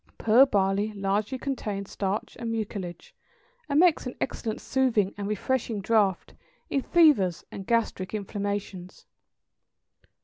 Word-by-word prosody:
Pearl 240 +5 +6
barley 200 -1 +1
largely 205 +5 -1
contains 210 -8 -4
starch 195 +1 -3
and 230 -1 -3
mucilage, 210 - -5 0.6
and 285 +1 +3
makes 340 -6 +4
an 250 - -6
excellent 220 -3 -3
soothing 235 -7 +1
and 200 -1 -4
refreshing 225 +1 -1
draught 200 -2 +1 0.4
in 275 - +1
fevers 270 - +3
and 195 - -8
gastric 225 -5 0
inflammations. 200 -3 -5
210 Hz, 115 wpm, -27 LUFS, 195-250 Hz, 0.6 s, Pearl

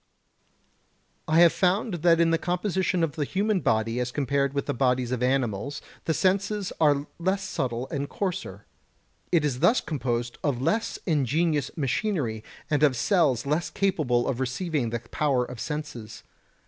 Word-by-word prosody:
I 160 +2 +4
have 170 -1 +7
found 195 +4 +1
that 170 -1 +5
in 165 -1 +4
the 165 - +2
composition 180 -1 0
of 165 - +1
the 150 0 -2
human 200 +6 0
body 115 -4 0
as 125 0 -2
compared 140 0 0
with 140 0 -2
the - - -1
bodies 125 -1 +1
of 125 -1 -1
animals 130 0 0 0.3
the 160 - +1
senses 200 +1 0
are 145 -2 +3
less 190 +3 0
subtle 125 -8 -3
and 140 0 -3
coarser; 165 - -4 0.7
it 165 -4 +3
is 130 -4 -1
thus 240 - +4
composed 120 -5 -3
of 140 -5 0
less 220 - 0
ingenious 150 - +1
machinery 135 - -1 0.2
and 150 -3 +1
of 145 -4 +4
cells 140 - +2
less 150 +4 0
capable 150 -11 +1
of 130 -2 -1
receiving 130 0 -1
the 120 0 -3
power 130 +1 0
of 125 -1 -9
senses. 125 -6 -6
145 Hz, 160 wpm, -26 LUFS, 125-175 Hz, 0.7 s, have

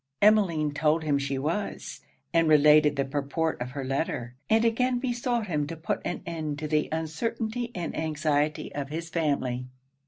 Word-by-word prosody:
Emmeline 185 -8 +4
told 155 +2 +2
him 145 -2 +1
she 140 -1 -2
was, 165 +9 -3 0.3
and 165 -1 +4
related 150 0 +6
the 140 -1 0
purport 145 +2 -2
of 125 - -3
her 135 +1 -5
letter, 130 -3 -2 0.2
and 225 +1 +4
again 250 +2 +2
besought 245 -2 -1
him 150 -6 -1
to 165 - -5
put 160 - -2
an 175 - -4
end 155 -3 -3
to 155 0 -4
the 150 0 +1
uncertainty 225 +9 -2
and 175 -2 -4
anxiety 155 -1 0
of 140 -1 -4
his 165 +2 -5
family. 140 -6 -1
155 Hz, 165 wpm, -27 LUFS, 145-180 Hz, 0.3 s, related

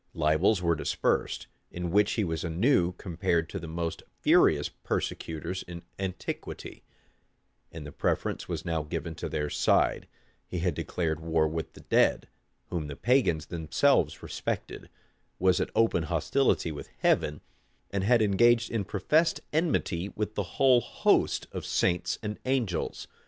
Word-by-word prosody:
Libels 85 +6 +2
were 85 -1 +3
dispersed, 80 - -1 0.2
in 90 -1 -4
which 105 +2 +3
he 110 - 0
was 80 -3 -2
anew 90 - +2
compared 85 -2 -1
to - - -5
the 85 - -7
most 85 +1 -3 0.2
furious - - +4
persecutors 85 +3 -4
in 85 -1 -9 0.2
antiquity; 95 -1 -5 0.9
and 80 -3 -8
the 75 - -8
preference - - -1
was - - -4
now 80 -1 0
given 80 +2 -4
to - - -5
their 75 - -1
side: - - +2 0.4
he 90 - -5
had 90 0 0
declared 80 +1 -2
war 80 -1 +1
with 80 0 -4
the - - -13
dead, - - +2 0.4
whom 85 -4 -2
the 70 - -6
pagans 115 - +2
themselves 80 - +1
respected; - - -4 0.5
was 95 0 +3
at - - -1
open 115 -6 +3
hostility 85 - +1
with 75 - -8
Heaven; 75 0 +2 0.5
and 100 -1 -1
had 115 +2 +4
engaged 120 +4 +4
in 110 -4 -1
professed 155 - +1
enmity 100 - 0
with 105 0 -2
the 105 - -1 0.2
whole 130 -3 +5
host - - +1
of - - -5
saints 90 -1 0
and 105 0 -4
angels. 125 -10 -1
90 Hz, 145 wpm, -28 LUFS, 80-105 Hz, 0.9 s, whole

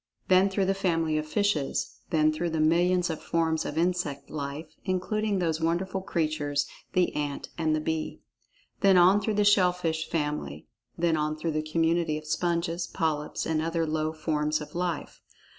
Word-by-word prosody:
Then 185 +1 +5
through 195 0 0
the 195 - +2
family 165 -5 0
of 155 - -5
fishes. 165 -5 -1
Then 155 -2 +3
through 170 +2 -2
the 160 -1 -2
millions 175 +3 +3
of 160 - -5
forms 160 -1 0
of 145 - -4
insect 165 -5 -1
life, 145 +1 -5
including 205 +2 0
those 165 -3 0
wonderful 185 +4 0
creatures, 155 -5 -1 0.3
the 180 -1 +2
ant 145 -1 -3
and 160 -2 +1
the 155 - -1
bee. 160 0 -3 0.6
Then 195 -2 +5
on 185 +4 +6
through 215 0 -1
the 210 0 +3
shell 195 -3 +5
fish 160 -3 -2
family. 150 - -3 0.3
Then 170 -1 +2
on 155 0 -1
through 160 +1 -2
the 155 0 0
community 165 0 +1
of 155 - -9
sponges, 170 +2 -1
polyps, 155 -4 -2
and 160 -1 0
other 165 0 0
low 155 0 -1
forms 155 -1 -1
of 150 - -9
life. 175 -3 -3
165 Hz, 175 wpm, -28 LUFS, 155-180 Hz, 0.6 s, on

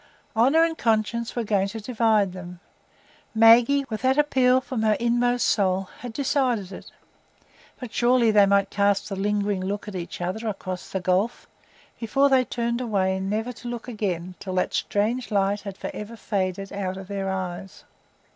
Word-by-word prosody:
Honour 270 +9 +4
and 330 -1 0
conscience 230 -1 0
were 240 - -1
going 200 -2 +1
to 225 +3 -6
divide 220 -4 +1
them; 180 -1 -9 0.8
Maggie, 235 +5 +6
with 220 -3 -5
that 265 +1 +2
appeal 260 -4 +4
from 260 -3 -4
her 215 -1 +3
inmost 240 +1 +1
soul, 190 -2 +1
had 245 - -7
decided 250 -6 0
it; 185 - -10 0.9
but 250 -3 -8
surely 240 -1 +3
they 205 -2 +5
might 200 0 +2
cast 200 0 +1
a - - -2
lingering 205 0 0
look 205 +2 -4
at 210 - -6
each 175 -2 -6
other 185 +6 -3
across 185 -3 -5
the 190 - -2
gulf, 185 +5 0 0.5
before 270 +5 +2
they 265 -1 +4
turned 235 0 -2
away 190 -5 0
never 215 +5 -2
to 240 - -10
look 240 0 -6
again 185 -6 -3
till 185 -2 -5
that 180 - 0
strange 230 +5 -1
light 200 -1 +1
had 200 -2 -8
forever 210 +2 -7
faded 195 -3 -3
out 190 -2 -3
of 190 -1 -9
their 195 -1 -3
eyes. 190 0 -5
210 Hz, 170 wpm, -24 LUFS, 195-240 Hz, 0.9 s, Maggie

